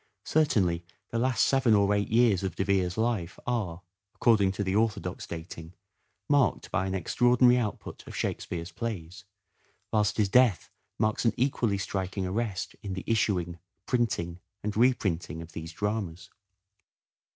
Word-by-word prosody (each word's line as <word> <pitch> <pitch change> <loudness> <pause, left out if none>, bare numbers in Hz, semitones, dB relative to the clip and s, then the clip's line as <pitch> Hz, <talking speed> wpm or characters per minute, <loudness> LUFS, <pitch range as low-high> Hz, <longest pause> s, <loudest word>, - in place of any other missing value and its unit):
Certainly 95 - +2 0.3
the 115 - -1
last 125 0 +2
seven 130 -5 +4
or 100 0 +3
eight 100 0 0
years 115 -4 +4
of 95 -1 -3
De - - 0
Vere's 95 -3 +1
life 110 -7 -1
are, 100 -8 -2 0.3
according 105 -5 +4
to 100 - -2
the 95 0 -1
orthodox 105 -5 -1
dating, 80 0 -8 0.5
marked 145 -3 +2
by 100 -3 0
an 95 - -2
extraordinary 125 +6 +4
output 110 -4 -5
of - - -8
Shakespeare's 85 +1 -3
plays, 105 -3 -5 0.7
whilst 105 -3 +2
his 105 -2 +3
death 115 -3 +3 0.3
marks 110 0 +1
an 115 - +3
equally 120 -5 +1
striking 95 0 -3
arrest 100 0 -3
in 100 -2 -5
the 95 - -5
issuing, 90 -6 0 0.3
printing 100 -9 -1 0.2
and 105 0 -2
reprinting 105 -9 +1
of 85 0 -9
these 80 +1 -7
dramas. 100 -4 -3
100 Hz, 145 wpm, -28 LUFS, 90-115 Hz, 0.7 s, seven